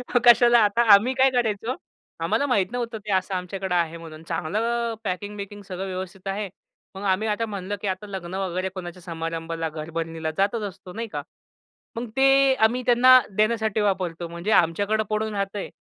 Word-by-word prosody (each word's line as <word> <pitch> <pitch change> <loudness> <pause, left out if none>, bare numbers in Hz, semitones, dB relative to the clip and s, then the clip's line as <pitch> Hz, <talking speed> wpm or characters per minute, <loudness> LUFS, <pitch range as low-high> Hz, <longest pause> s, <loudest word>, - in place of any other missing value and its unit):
मग 245 - +5
कशाला 240 0 +7
आता 210 +3 +2
आम्ही 220 +6 +5
काय 265 +1 +4
करायचो? 235 -1 0 0.5
आम्हाला 285 - +1
माहीत 205 -6 +1
नव्हतं 235 -2 -3
ते 210 - -3
असं 190 +1 0
आमच्याकडं 185 0 -3
आहे 170 -1 0
म्हणून 160 -1 -11
चांगलं 230 +8 -1
पॅकिंग-बिकिंग 205 +1 -5
सगळं 190 0 -5
व्यवस्थित 185 0 -6
आहे. 200 +1 -2 0.5
मग 190 - -7
आम्ही 215 +4 -2
आता 215 +2 0
म्हणलं, 200 -2 -4
की 205 - -3
आता 190 +2 -3
लग्न 185 -3 -6
वगैरे, 185 -1 -2
कोणाच्या 180 -1 -8
समारंभाला, 165 -1 -4
घरभरणीला 160 +1 -4
जातच 205 +4 +1
असतो 180 -1 -13
नाही 230 +3 -4
का? 220 - -5 0.8
मग 235 +1 -4
ते 270 0 +5
आम्ही 245 +1 +2
त्यांना 255 +1 +7 0.2
देण्यासाठी 220 0 +1
वापरतो. 180 -4 -1
म्हणजे 170 +5 -4
आमच्याकडे 205 +6 0
पडून 215 0 -1
राहतंय. 200 0 -3
200 Hz, 165 wpm, -24 LUFS, 180-225 Hz, 0.8 s, कशाला